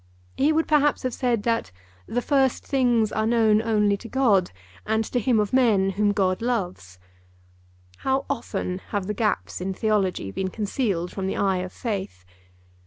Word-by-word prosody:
He 290 +3 +3
would, 320 +1 +1
perhaps, 295 -1 +2
have 255 -1 -2
said 235 -4 0
that 230 - 0 0.4
'the 245 +1 -2
first 270 -3 +1
things 240 -5 +2
are 220 0 0
known 220 -2 +3
only 210 -2 +2
to 230 +3 -11
God 210 -9 +3 0.3
and 220 +1 0
to 245 - -1
him 235 -1 +2
of 210 +1 -1
men 215 -7 +3
whom 205 +2 +1
God 190 -2 0
loves.' 185 - -3 1.0
How 265 - -1
often 195 -8 -3
have 205 -3 -2
the 210 - -2
gaps 180 - -1
in 190 +1 -3
Theology 195 - 0
been 190 - -2
concealed 200 -4 -2
from 190 -1 -4
the - - -2
eye 195 -2 +1
of 185 0 -4
faith! 190 - -5
215 Hz, 170 wpm, -24 LUFS, 190-245 Hz, 1.0 s, He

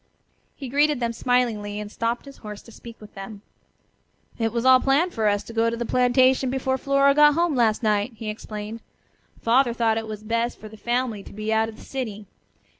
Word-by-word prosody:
He 275 - -7
greeted 290 +2 +2
them 235 -1 -1
smilingly, 225 -4 0
and 210 0 -7
stopped 230 +3 -2
his 275 -1 -12
horse 210 -2 -9
to 230 - -15
speak 230 +1 -12
with 210 - -14
them. 200 +1 -9 1.0
"It 225 -1 0
was 235 +2 -2
all 260 0 +7
planned 285 +8 +2
for 220 -2 0
us 205 0 +1
to 230 - -11
go 230 0 +2
to 230 - -4
the 240 - -3
plantation 255 +2 +3
before 265 0 -1
Flora 275 +1 +3
got 295 0 +6
home 340 -1 +2
last 230 -2 +2
night," 210 +2 +1
he 220 0 -7
explained. 215 +1 -6 0.6
"Father 240 +1 +3
thought 225 -1 +1
it 220 - -7
was 215 -1 -7
best 230 +2 -1
for 215 - -9
the 220 - -12
family 240 -1 -2
to - - -13
be 215 +2 -2
out 220 0 +2
of 220 - -10
the - - -14
city. 220 -6 -5
230 Hz, 210 wpm, -24 LUFS, 215-255 Hz, 1.0 s, all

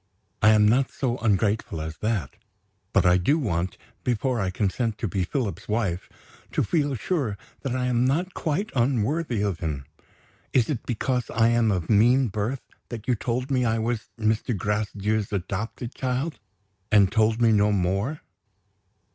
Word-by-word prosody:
I 110 - +7
am 105 -1 +5
not 125 +4 +3
so 125 -3 -1
ungrateful 105 -4 +1
as 80 0 -5
that. 105 -9 -2 0.6
But - - +3
I 90 0 +6
do 140 - +3
want, 90 - -1 0.3
before 125 +1 0
I 95 -3 0
consent 105 +4 -1
to 115 - -2
be 95 +1 -1
Philip's 100 - -3
wife, 100 -5 -1 0.4
to - - +2
feel 145 -5 0
sure 125 - -1 0.2
that 130 -3 -2
I 125 -1 0
am 125 -1 +2
not 170 +8 0
quite 170 +7 -2
unworthy 125 0 +1
of 100 -5 -1
him. 75 -5 -3 0.7
Is 125 +1 +3
it 125 - -4
because 125 0 -1
I 115 0 +3
am 120 -1 +3
of 90 -4 -1
mean 120 +4 +4
birth 110 +6 -2 0.3
that 115 -2 -7
you 125 - +3
told 125 +4 -2
me 130 -2 +2
I 115 -1 +1
was 115 0 -2
Mr. 110 +1 0
Gracedieu's 105 +1 -1
adopted 100 +5 -4
child 130 +5 -2 0.5
and 100 -3 +5
told 110 +1 +2
me 115 -1 +5
no 105 -1 +4
more?" 100 - 0
110 Hz, 165 wpm, -25 LUFS, 100-125 Hz, 0.7 s, I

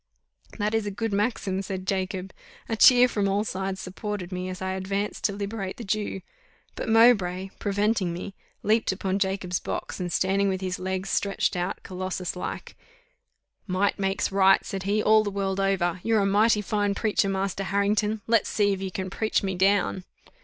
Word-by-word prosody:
'" - - -20
"That 210 0 -1
is 220 -2 0
a - - 0
good 215 +2 -3
maxim," 200 -2 0
said 190 -1 -5
Jacob: 190 0 -2 0.3
a 225 - -1
cheer 250 +2 +7
from 205 -5 0
all 200 +2 +1
sides 190 -2 -3
supported 190 0 -5
me, 180 0 -3
as 185 0 -6
I 190 0 -2
advanced 195 +2 -3
to - - +3
liberate 200 -1 -4
the 235 - -7
Jew; 205 -2 -2 0.5
but - - -5
Mowbray, 195 -5 +4
preventing 205 -2 0
me, 175 +3 -6 0.3
leaped 220 +1 +2
upon 190 0 -2
Jacob's 190 -2 -1
box, - - -5
and 180 -1 -3
standing 195 +3 +2
with 190 -1 -1
his 185 -1 -3
legs 190 +1 -3
stretched 200 -1 0
out, 180 +1 -3
Colossus 185 -1 -4
like, 180 - -6 0.9
"Might 195 +2 0
makes 195 0 0
right," 195 0 +4
said 195 - -4
he, 210 +1 +2
"all 215 0 +5
the 205 - -2
world 195 -1 -2
over. 185 -3 +1
You're 225 0 +2
a - - +2
mighty 210 +2 +3
fine 205 0 0
preacher, 210 -2 +1
Master 195 0 -2
Harrington; 210 +2 +1
let's 225 -2 +2
see 205 -2 +2
if 190 - -5
you 190 - -3
can 185 0 -5
preach 220 +1 0
me 190 -1 -1
down." 190 0 +2
195 Hz, 185 wpm, -26 LUFS, 190-210 Hz, 0.9 s, cheer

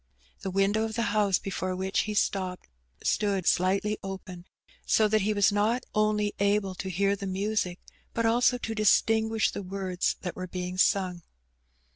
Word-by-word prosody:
The 190 - -4
window 195 +3 +1
of 220 -1 -5
the 235 - 0
house 205 -3 +3
before 185 -1 -3
which 190 +1 -1
he 210 0 -1
stopped 185 -3 -1 0.4
stood 200 -4 0
slightly 195 +4 +1
open, 190 -2 -8 0.4
so 215 - +3
that 215 0 +2
he 210 +3 +1
was 205 -1 +3
not 215 +5 +1
only 210 -1 +1
able 200 -1 +1
to 190 +1 -5
hear 195 +2 +1
the 195 0 -6
music, 190 -1 -1 0.3
but 230 - -1
also 245 +2 +3
to 225 -2 -4
dis 215 -1 +5
tinguish 220 0 +1
the - - -5
words 185 -1 -2
that 180 - -5
were 185 0 -5
being 180 +1 -5
sung. 185 -3 +2
200 Hz, 170 wpm, -28 LUFS, 185-215 Hz, 0.4 s, dis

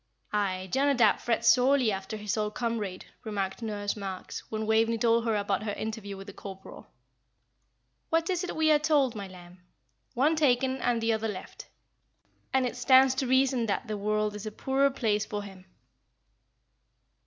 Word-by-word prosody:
"Aye, 190 -3 -1
Jonadab 265 -5 +3
frets 235 -1 0
sorely 255 -2 +4
after 195 +2 -5
his 210 0 -2
old 210 -1 -2
comrade," 220 -6 -3 0.2
remarked 200 -1 -3
Nurse 205 -2 -3
Marks, 195 -3 -6
when 220 0 -3
Waveney 225 +1 +2
told 230 0 +2
her 225 -2 +1
about 200 -1 0
her 210 -1 -3
interview 215 -2 -5
with 195 - -9
the 200 - -10
corporal. 190 -1 -10 1.2
"What 330 0 +1
is 360 0 -1
it 365 - -4
we 315 0 +3
are 300 - +5
told, 295 -5 +2
my 200 -3 -6
lamb? 180 -1 -14 0.6
'One 290 +6 +3
taken 265 -3 +2
and 245 -3 0
the 225 0 +2
other 220 0 -1
left'; 200 -4 -8 0.8
and 265 -1 +2
it 250 - -3
stands 260 +1 +5
to 265 0 -2
reason 260 -2 +2
that 205 - -2
the 215 - -3
world 210 +1 -1
is 210 +1 -6
a - - -4
poorer 270 +5 +1
place 215 -6 0
for 205 -1 -4
him." 190 -2 -12
220 Hz, 170 wpm, -28 LUFS, 205-260 Hz, 1.2 s, are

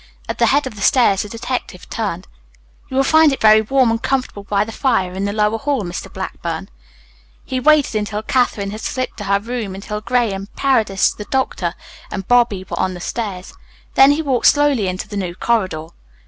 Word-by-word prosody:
At - - -4
the - - +4
head 290 0 +3
of 260 - -5
the 205 - -10
stairs 200 -3 +4
the 210 - -6
detective 230 -5 -5
turned. 195 -5 -4 0.6
"You 260 - -3
will 270 - +4
find 315 +2 +5
it 270 - -2
very 215 0 +6
warm 255 +2 +2
and 230 0 -1
comfortable 255 -6 -2
by 200 0 +1
the 220 - -7
fire 220 -8 0
in 190 +2 -2
the 200 - -1
lower 210 +1 +1
hall, 280 -4 -1
Mr. 175 -1 -6
Blackburn." - - -5 0.8
He 260 - -2
waited 300 0 +4
until 210 0 -2
Katherine 220 -5 0
had 215 +1 -7
slipped 255 -1 -3
to 205 - -6
her 200 0 +2
room 225 -3 -4
until 210 +2 -5
Graham, 215 -5 0
Paredes, 225 -8 +2
the 210 - -8
doctor, 195 -10 -1 0.3
and 195 -2 -5
Bobby 235 -6 +3
were - - -5
on 185 -1 0
the - - -8
stairs. 195 -1 -5 0.4
Then 275 +2 +7
he 315 +2 -2
walked 265 -5 +2
slowly 290 -8 +3
into 185 +1 -4
the 205 - -6
new 180 -3 -3
corridor. 185 -9 -1
215 Hz, 200 wpm, -19 LUFS, 195-255 Hz, 0.8 s, Then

